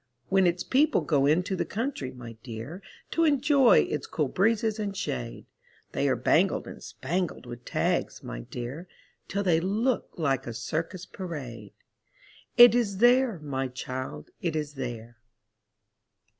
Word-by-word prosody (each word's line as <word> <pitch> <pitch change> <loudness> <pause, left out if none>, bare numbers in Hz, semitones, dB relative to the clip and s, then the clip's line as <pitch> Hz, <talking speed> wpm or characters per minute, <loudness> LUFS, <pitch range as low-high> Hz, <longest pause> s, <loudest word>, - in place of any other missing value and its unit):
When 190 -1 +4
its 175 +1 0
people 290 +4 +3
go 140 -3 +2
into 180 +5 +2
the - - 0
country, 225 - -3
my 120 -2 -9
dear, 125 - -7 0.3
To 330 - +2
enjoy 280 -4 +5
its 150 - -3
cool 150 -4 -1
breezes 220 - +1
and 200 -2 -3
shade, 125 -9 -4 0.5
They - - +1
are - - +3
bangled - - +2
and - - -10
spangled 175 +1 -3
with 120 0 -9
tags, - - -1
my - - -6
dear, 125 - -7 0.4
Till 200 +1 -1
they 170 -4 +3
look 215 +8 0
like 140 -7 0
a 120 - -5
circus 165 - -3
parade. 130 - -7 0.8
It 240 0 +10
is 220 -5 +1
there, 245 -1 +4
my 135 -2 -2
child, 130 - -6
it 165 -3 -1
is 150 -1 -3
there. 120 -4 -6
165 Hz, 145 wpm, -27 LUFS, 130-210 Hz, 0.8 s, It